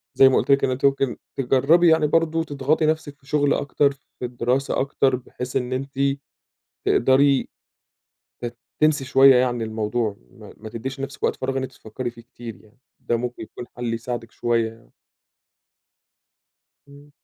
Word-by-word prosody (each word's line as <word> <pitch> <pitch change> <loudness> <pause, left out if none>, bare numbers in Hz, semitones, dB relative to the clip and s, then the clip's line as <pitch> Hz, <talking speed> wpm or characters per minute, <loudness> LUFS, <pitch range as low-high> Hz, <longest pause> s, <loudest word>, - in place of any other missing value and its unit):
زي 135 0 +7
ما 130 - +3
قُلت - - +1
لِك 140 - +4
إن - - +3
أنتِ 130 +2 -1
ممكن 135 -2 +1 0.2
تجربي 145 +7 +4
يعني 160 -1 +4
برضه 165 +1 +1
تضغطي 145 +2 0
نفسِك 155 -2 -1
في 135 - -25
شغل 145 0 +2
أكتر، 140 0 +1
في 140 -2 -10
الدراسة 125 +3 -1
أكتر، 135 -1 +1
بحيث 125 0 -7
إن 130 -1 -1
أنتِ 135 +1 -5 0.9
تقدري 135 +2 +3 0.9
ت 120 -1 -5 0.2
تنسي 155 -3 +3
شوية 135 0 +7
يعني 125 -2 +1
الموضوع 110 -1 -2
ما - - -14
ما 110 +1 -9
تديش 130 +5 -6
لنفسِك 135 +1 -6
وقت - - +2
فراغ 135 +1 -2
إن 130 - -1
أنتِ 130 - -5
تفكري 120 +3 -6
فيه 115 0 -14
كتير 115 -1 -10
يعني، 110 +3 -24 0.2
ده 120 - -1
ممكن 125 -1 -5
يكون 120 - -9
حل 120 -1 -2
يساعدِك 115 0 -5
شوية 115 -1 0
يعني. 115 - -22 2.0
امم. 145 +1 -16
130 Hz, 165 wpm, -23 LUFS, 120-140 Hz, 2.0 s, زي